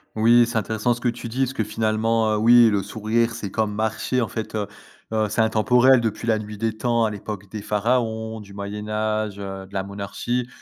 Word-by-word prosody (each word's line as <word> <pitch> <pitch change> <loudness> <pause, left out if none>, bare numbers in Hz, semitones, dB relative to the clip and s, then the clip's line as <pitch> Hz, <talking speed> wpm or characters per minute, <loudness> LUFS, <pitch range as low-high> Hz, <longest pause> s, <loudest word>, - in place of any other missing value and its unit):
Oui, 120 +2 +5
c'est 115 -1 -1
intéressant 110 +3 0
ce 120 - -9
que 125 - 0
tu 120 0 -3
dis 120 +3 -6
parce 135 -1 +1
que 115 - -1
finalement, 110 +1 +1
heu, - - 0
oui 120 +1 +7
le 100 -2 0
sourire 115 +3 0
c'est 110 -4 -5
comme 110 +1 -1
marcher. 110 +4 -1
En 115 - 0
fait, 110 +2 -5
heu, 105 -2 -2 0.4
heu, 110 -1 +1
c'est 105 +3 0
intemporel 125 +3 +4
depuis 115 0 -3
la 110 -1 +3
nuit 105 -1 -7
des 110 -1 -1
temps 115 0 +1
à - - +1
l'époque 100 -1 -7
des 105 -1 -6
pharaons 110 0 -1
du 100 -2 -12
moyen 100 +1 -6
âge, 110 -1 -1
heu, 95 -1 -6
de 95 - -19
la 95 - 0
monarchie 100 +5 -3
110 Hz, 220 wpm, -23 LUFS, 105-115 Hz, 0.4 s, oui